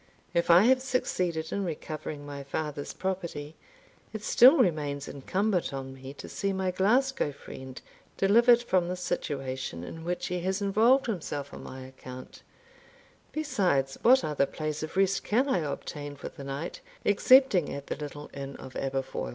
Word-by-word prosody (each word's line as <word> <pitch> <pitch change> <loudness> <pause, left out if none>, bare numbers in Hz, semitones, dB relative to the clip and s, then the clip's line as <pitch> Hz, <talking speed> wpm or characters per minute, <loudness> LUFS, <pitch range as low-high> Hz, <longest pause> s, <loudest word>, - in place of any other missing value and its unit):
If 170 0 +1
I 175 +3 +8
have 255 +2 +5
succeeded 180 -11 -1
in 200 - -1
recovering 155 -3 -5
my 145 -1 -6
father's 145 +1 -4
property, 170 -5 -4 0.6
it 215 -1 -6
still 260 +8 +7
remains 150 - +1
incumbent 185 +7 -1
on 135 0 -6
me 135 0 -9
to - - -9
see 200 0 -2
my 190 -1 0
Glasgow 225 - +2
friend 130 -2 -10 0.4
delivered 235 +4 +5
from 185 -6 +2
the 180 - -2
situation 135 - -3
in 160 - -8
which 175 +1 -2
he 180 0 -2
has 190 +2 -1
involved 220 +7 +4
himself 150 - -4
on - - -8
my 130 0 -8
account; 130 -1 -11 0.9
besides, 180 - 0
what 260 +3 +6
other 145 -2 +1
place 155 -1 -4
of 155 +4 -5
rest 195 0 +2
can 250 +6 +2
I 265 - +2
obtain 145 -1 -5
for - - -7
the 140 - -10
night 140 +5 -5 0.2
excepting 205 - +5
at 140 0 -6
the - - -3
little 145 0 -8
inn 140 0 -6
of 130 - -10
Aberfoil? 135 - -3
165 Hz, 160 wpm, -28 LUFS, 140-200 Hz, 0.9 s, I